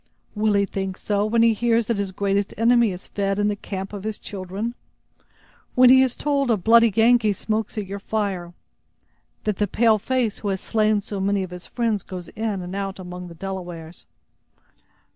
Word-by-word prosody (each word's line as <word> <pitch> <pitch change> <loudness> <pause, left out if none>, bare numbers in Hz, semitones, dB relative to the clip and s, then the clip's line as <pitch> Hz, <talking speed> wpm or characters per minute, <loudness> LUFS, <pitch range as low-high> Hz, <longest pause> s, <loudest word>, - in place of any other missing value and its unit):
"Will 215 0 +1
he 200 0 +3
think 190 -1 -4
so 205 0 0
when 230 +1 +3
he 230 -1 +5
hears 230 +1 +1
that 225 -2 -1
his 200 -2 -2
greatest 200 +1 -1
enemy 235 -1 +4
is 180 +1 -8
fed 195 -1 -1
in 205 0 +2
the 205 - -1
camp 195 0 -6
of 200 -2 -6
his 215 0 -3
children? 200 +4 -5 1.0
When 250 0 +7
he 260 0 +8
is 260 -2 +1
told 280 -3 0
a 225 - +3
bloody 230 +5 +5
Yengee 225 0 +4
smokes 220 +2 -3
at 210 - -2
your 200 +1 -6
fire? 195 -5 -3 0.9
That 210 -3 -1
the 205 - +1
pale 220 +2 +3
face 245 -1 -1
who 210 - -5
has 190 -1 -1
slain 215 0 +1
so 200 -1 -6
many 195 0 +1
of 185 - -7
his 180 0 -9
friends 230 -4 -1
goes 180 -2 -8
in 210 -4 -3
and 180 +2 -6
out 195 -1 -3
among 180 -1 -8
the 170 - -11
Delawares? 175 -2 -7
205 Hz, 195 wpm, -23 LUFS, 190-225 Hz, 1.0 s, he